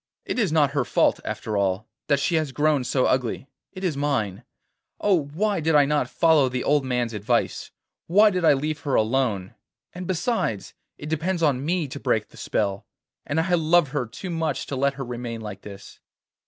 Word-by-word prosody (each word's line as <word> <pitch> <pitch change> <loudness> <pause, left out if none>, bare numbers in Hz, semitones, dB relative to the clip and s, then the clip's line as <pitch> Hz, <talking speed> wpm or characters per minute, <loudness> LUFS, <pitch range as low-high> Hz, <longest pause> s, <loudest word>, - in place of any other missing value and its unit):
'It - - -2
is 205 -8 +1
not 150 -3 +3
her 140 -2 +1
fault, 120 - +2
after 110 - -4
all, 100 +1 0 0.2
that 140 -2 +3
she 140 - 0
has 155 -4 +1
grown 145 0 +2
so 125 +1 +1
ugly, 130 0 0 0.3
it 185 0 -9
is 175 -6 0
mine. 135 -10 -1 0.6
Oh! 185 -8 +2
why 195 +7 -1
did 160 0 +1
I 145 -1 +6
not 150 +1 0
follow 160 -5 +4
the 125 0 -3
old 145 -1 +2
man's 125 -3 -1
advice? 110 +3 -1 0.4
Why 210 +5 +5
did 180 -2 -1
I 160 - +6
leave 150 +3 -2
her 140 -4 -1
alone? 110 -5 0 0.4
And 180 0 -7
besides, 185 - -1 0.2
it 150 - -8
depends 165 +3 -1
on 140 -4 +2
me 170 0 0
to 140 +2 -7
break 110 -6 0
the - - -17
spell, 100 -2 -2 0.4
and 145 +3 0
I 175 +2 0
love 165 -2 +3
her 135 -4 -2
too 180 - -7
much 160 -3 -2
to 140 - -5
let 140 +1 +1
her 135 -1 -5
remain 120 -1 -5
like 105 -3 -7
this. 100 -1 -11
140 Hz, 195 wpm, -24 LUFS, 120-160 Hz, 0.6 s, I